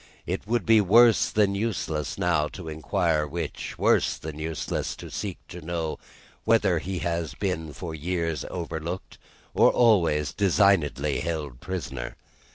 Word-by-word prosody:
It 95 +3 -3
would 115 -3 0
be 110 -1 +6
worse 115 +4 +5
than 105 -2 +2
useless 90 - -2
now 85 -4 +2
to 90 -4 -8
inquire 80 0 0
which; 80 +1 -5
worse - - +2
than 75 -1 -7
useless 80 0 -3
to - - -10
seek - - -4
to 90 - -8
know 80 -1 -3 0.4
whether 100 -7 +3
he 95 +3 -4
has 85 -4 -2
been 80 -4 -2
for 80 +2 -6
years 80 0 -2
overlooked, 85 +1 -5 0.3
or - - +6
always 85 -11 +3
designedly 90 -8 +2
held 75 -7 -4
prisoner. 90 +2 -5
85 Hz, 140 wpm, -26 LUFS, 80-95 Hz, 0.4 s, be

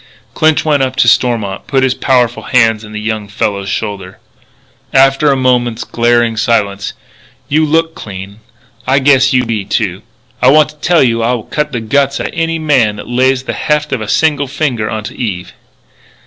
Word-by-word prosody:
Clinch 155 0 +2
went 150 -3 +2
up 130 -1 -1
to - - +2
Stormont, 110 -6 +1
put 135 -2 +1
his 130 -1 +2
powerful 125 -3 +1
hands 115 -3 +2
on 105 - -11
the 105 - -5
young 110 -1 -3
fellow's 100 -1 -3
shoulders. 100 -3 -4 0.8
After 135 +2 +4
a - - +2
moment's 120 -3 0
glaring 120 -1 +1
silence: 100 -3 0 0.6
"You 155 +2 +2
look 165 +2 +1
clean. 100 -2 -9 0.5
I 135 +1 +3
guess 135 -1 +4
you 125 -1 +2
be, 110 -3 -2
too. 100 - -2 0.4
I 125 - +4
wanta 150 +1 +3
tell 170 +1 +2
you 115 -2 +1
I'll 120 0 -1
cut 150 0 -3
the 120 -4 -3
guts 140 +5 0
outa - - -4
any 165 -1 -1
guy 140 -9 +2
that 105 - -9
lays 130 +1 +1
the - - -4
heft 150 -1 -1
of 125 - -2
a 110 - -5
single 145 +3 +1
finger 130 -6 -2
onto 110 0 -5
Eve." 95 -7 -5
125 Hz, 175 wpm, -13 LUFS, 110-140 Hz, 0.8 s, After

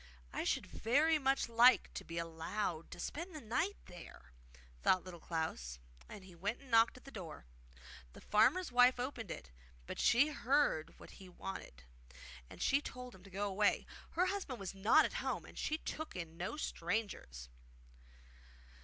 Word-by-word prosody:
'I - - -2
should - - +1
very 300 +7 +2
much 270 -1 +2
like 235 +2 +5
to - - -5
be 165 - -7
allowed 165 +1 -3
to - - -9
spend 335 - -5
the - - -5
night 300 - -1
there,' 175 -1 -12 0.5
thought 185 - +4
Little 180 -2 -9
Klaus; 160 - -3 0.3
and 195 - -9
he 185 -1 -13
went 200 +7 -3
and 275 -3 -15
knocked 230 +2 +5
at - - -15
the 275 - -10
door. 170 - -8 0.7
The - - -12
farmer's 345 +11 +3
wife 245 +1 +6
opened 245 -5 -4
it, 65 - -7 0.3
but - - -6
when - - +1
she 265 +6 +5
heard 270 - +1
what - - -12
he 190 -1 -12
wanted 175 - -8 0.7
she 280 +1 +2
told 250 -3 -7
him 190 - -15
to 195 - -14
go 200 +2 -2
away; 205 +1 +2 0.3
her 360 - +3
husband 370 - -3
was 195 -1 -5
not 215 +11 +5
at - - -3
home, - - -2
and - - -13
she 310 - -1
took 315 0 -5
in 165 -3 -6
no 185 - -4
strangers. 170 - -3
215 Hz, 170 wpm, -36 LUFS, 175-275 Hz, 0.7 s, wife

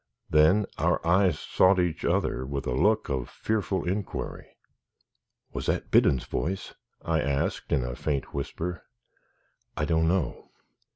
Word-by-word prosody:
Then 80 +7 +5
our - - +2
eyes 90 -1 +3
sought 95 0 +3
each 90 -3 0
other 65 - 0
with 70 +1 -4
a 60 - -1
look 105 - +2
of 65 -3 -2
fearful 100 -5 -2
inquiry. 95 +2 -3 1.1
"Was - - -4
that - - -1
Biddon's 65 - +4
voice?" 95 +3 -3 0.3
I 80 -2 +1
asked, 70 -1 -1
in 65 - +2
a - - -4
faint 70 -1 -2
whisper. 80 +4 -4 1.0
"I 75 - +1
don't 80 0 +2
know. 90 -1 -1
80 Hz, 135 wpm, -27 LUFS, 70-95 Hz, 1.1 s, Then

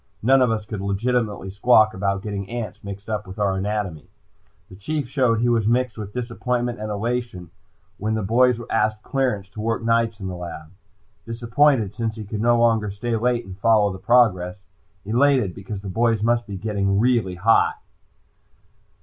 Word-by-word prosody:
None 135 +3 +5
of 125 - +4
us 110 -2 -2
could 105 -2 -5
legitimately 105 0 -1
squawk 110 +1 +4
about 100 0 -1
getting 100 -2 -5
ants 115 -4 -6
mixed 100 0 -8
up 105 -2 -3
with 95 +2 -9
our 100 -2 +1
anatomy. 95 -5 -3 0.6
The 95 - -13
Chief 140 +7 -3
showed 125 -4 +1
he 120 - +2
was 115 -3 +2
mixed 125 0 +1
with 105 -2 -7
disappointment 120 0 -2
and 110 0 -4
elation 105 -4 -3 0.5
when 110 +2 -1
the 110 - -2
boys 120 +3 +3
asked 110 -1 0
clearance 125 -8 -1
to 105 +1 -8
work 115 +1 -1
nights 115 -1 +1
in 95 - -6
the 95 - -4
lab. 85 -3 -8 0.6
Disappointed 115 -1 +2
since 110 0 -3
he 110 -2 -7
could 105 +1 -4
no 120 +1 +4
longer 115 -3 +2
stay 115 +4 -3
late 120 +1 0
and 95 -1 -9
follow 105 0 +3
the 95 - -8
progress; 95 -6 +2 0.4
elated 125 -2 +2
because 100 +1 -7
the 100 - -8
boys 115 +2 +1
must 120 0 +1
really 100 -2 -5
be 95 - -14
getting 100 0 +1
hot. 105 +6 +3
110 Hz, 175 wpm, -22 LUFS, 100-120 Hz, 0.6 s, None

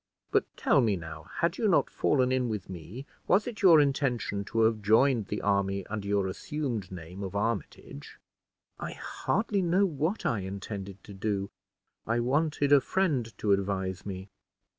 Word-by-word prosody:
But - - +3
tell 140 - +4
me, 110 -4 +2
now, 80 -3 -8
had 170 - -1
you 225 - +2
not 185 - +4
fallen 130 -3 +2
in 130 -2 +1
with 105 -4 -4
me, 90 - -8 0.2
was 200 +3 +4
it 230 -3 -6
your 175 -6 +8
intention 135 -8 0
to 115 +2 0
have 110 -1 +3
joined 110 +1 +3
the 105 - -4
army 100 -1 +1
under 105 -2 -5
your 100 -1 +1
assumed 115 0 -3
name 90 +1 -8
of 95 0 -5
Armitage?" 105 -8 -4 0.6
"I - - -5
hardly 205 -1 -1
know 180 +3 +3
what 160 +4 -2
I 115 - +1
intended 100 0 -6
to 100 - -11
do. 100 0 -2 0.6
I 115 +1 +1
wanted 145 +3 +1
a 145 -1 +7
friend 145 -13 0
to 105 - 0
advise 95 -2 -1
me." 95 0 -7
110 Hz, 165 wpm, -29 LUFS, 100-140 Hz, 0.6 s, your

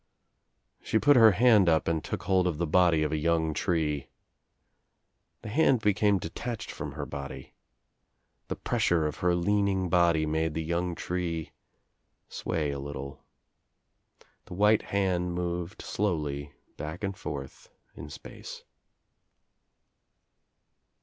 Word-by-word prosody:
She - - 0
put 145 +5 +5
her 115 -4 +7
hand 105 -4 +5
up 80 -1 +2
and 80 -2 0
took 90 - -4
hold 95 0 +2
of 85 -4 -1
the 85 - 0
body 85 -1 +3
of 75 - -1
a 80 - 0
young 80 -1 +1
tree. 75 -4 -1 1.3
The 110 - -6
hand 135 +1 +3
became 105 -1 +3
detached 110 +7 -5
from - - -6
her - - -5
body. 70 -1 -8 0.9
The - - -3
pressure 85 -3 +1
of 75 - -3
her 90 0 +2
leaning 95 0 +1
body 85 -3 +3
made 80 0 -1
the 80 - -1
young 85 +2 -1
tree 85 -3 -3 0.8
sway 75 -4 -2
a 70 - -4
little. 70 -1 -7 1.2
The - - -9
white 105 +3 +4
hand 90 -3 -1
moved 90 +2 -4
slowly 75 -8 -2 0.3
back 80 +7 -6
and 100 -1 -2
forth 70 -8 -7 0.2
In 75 +2 -9
space. 70 - -10
85 Hz, 130 wpm, -28 LUFS, 80-95 Hz, 1.3 s, her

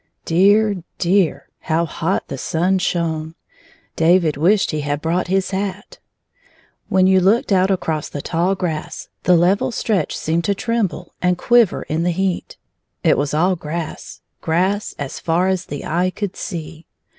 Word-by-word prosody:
Dear, 200 +4 +4 0.2
dear; 180 -2 +1
how 165 +1 0
hot 170 +3 -2
the - - -5
sun 185 +3 +1
shone! 160 -3 -2 0.6
David 165 -1 +3
wished 185 +8 +2
he 155 -2 -2
had 145 0 -2
brought 170 +4 -1
his 190 +1 0
hat. 195 +1 -4 0.9
When 190 -1 +4
you 190 0 +5
looked 200 +6 +2
4 195 - +4
9 - - +3
out - - -1
across 160 -5 -2
the 145 - -5
tall 180 +3 0
grass, 165 -5 -4 0.2
the 180 -1 +5
level 185 +7 +2
stretch 210 -7 -1
seemed 165 +2 -1
to 200 - +1
tremble, 205 -6 -2
and 180 0 +2
quiver 240 -1 +3
in 155 +2 -2
the 175 - +1
heat. 185 +1 -2 0.5
It - - +4
was 145 +1 -1
all 180 +4 +2
grass, 165 0 -6 0.2
grass 185 +6 0
as 140 -2 -5
far 175 +3 +1
as 185 -1 -1
the 145 - -6
eye 175 +3 +1
could 200 0 -5
see. 165 -3 -7
180 Hz, 165 wpm, -20 LUFS, 160-190 Hz, 0.9 s, you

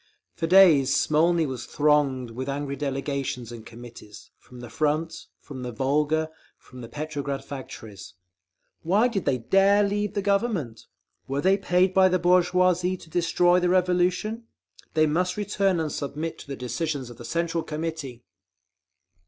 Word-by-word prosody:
For 165 - -3
days 160 -7 +6
Smolny 165 +2 +2
was 130 -4 -6
thronged 145 -5 +1
with 130 +4 -5
angry 140 0 -3
delegations 135 -4 -3
and 115 -2 -9
committees, 115 -2 -13
from 125 - -15
the 120 -1 -9
front, 155 +5 -2
from 135 -3 -9
the 125 -1 -5
Volga, 150 +6 0 0.3
from 125 0 -14
the 115 - -9
Petrograd 145 -1 -4
factories. 110 -8 -9 0.7
"Why 200 +8 +3
did 205 -7 -3
they 135 -3 +1
dare 195 - +3
leave 205 +1 -1
the 200 - -1
Government? 200 - -1 0.4
Were 135 +1 -2
they 190 +3 +4
paid 185 -1 +1
by 190 0 +5
the 185 - +2
bourgeoisie 180 +1 +2
to 160 - -16
destroy 175 +1 +3
the 180 0 +1
Revolution? 185 +5 +1 0.5
They 155 0 +4
must 180 +5 0
return 200 -3 0
and 155 -2 -2
submit 150 +4 -4
to - - -12
the 140 - -5
decisions 130 +1 -4
of 120 - -13
the 120 - -10
Central 170 +6 -1
Committee!" 150 -6 -5
155 Hz, 155 wpm, -25 LUFS, 135-180 Hz, 0.7 s, days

